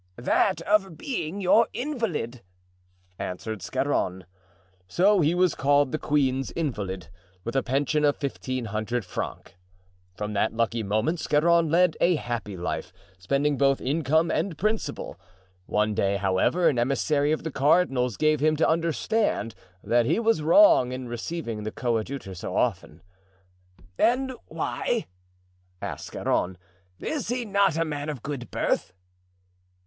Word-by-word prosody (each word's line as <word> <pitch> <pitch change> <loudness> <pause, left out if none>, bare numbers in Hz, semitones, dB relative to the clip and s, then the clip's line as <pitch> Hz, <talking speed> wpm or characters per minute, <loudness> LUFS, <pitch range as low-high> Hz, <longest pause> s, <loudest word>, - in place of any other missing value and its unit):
"That 165 +10 +1
of 195 -6 +1
being 200 - -4
your 205 +5 +5
invalid," 225 - -3 0.8
answered 100 +3 -5
Scarron. 95 -7 -1 0.6
So 195 - +3
he 160 +3 +2
was 180 -2 +3
called 145 0 +2
the 155 - -2
queen's 135 -3 +1
invalid, 100 - -3 0.3
with 115 - -5
a 135 - +3
pension 140 +4 0
of 145 -1 +3
fifteen 130 -3 -3
hundred 110 +2 -2
francs. 90 - -5 0.7
From 105 0 -4
that 105 +1 +1
lucky 115 0 0
moment 110 - 0
Scarron 165 +2 +3
led 170 0 +3
a 175 0 +4
happy 115 -8 -4
life, 90 - -4 0.3
spending 140 +9 0
both 135 -1 +3
income 160 +4 +1
and 165 0 -1
principal. 210 - -2 0.5
One 105 0 +1
day, 100 -2 +1
however, 100 - +2
an 125 - +2
emissary 140 +4 +1
of 155 - -1
the 160 - -4
cardinal's 135 - +2
gave 155 -1 +2
him 155 +2 +3
to 155 - +2
understand 165 - 0 0.3
that 120 0 +2
he - - +2
was 225 -8 +2
wrong 155 - +6
in 130 -1 -5
receiving 120 -1 -4
the 105 - -3
coadjutor 120 -2 -3
so 90 +1 -6
often. 95 -9 -1 1.0
"And 260 +2 +2
why?" 235 -3 -2 0.7
asked - - -6
Scarron; 90 0 -1 0.4
"is 300 -5 -3
he 245 +1 -2
not 200 -5 +2
a 165 - +1
man 145 -1 -4
of 140 -6 -6
good 140 -4 -5
birth?" - - -1
145 Hz, 140 wpm, -26 LUFS, 115-170 Hz, 1.0 s, wrong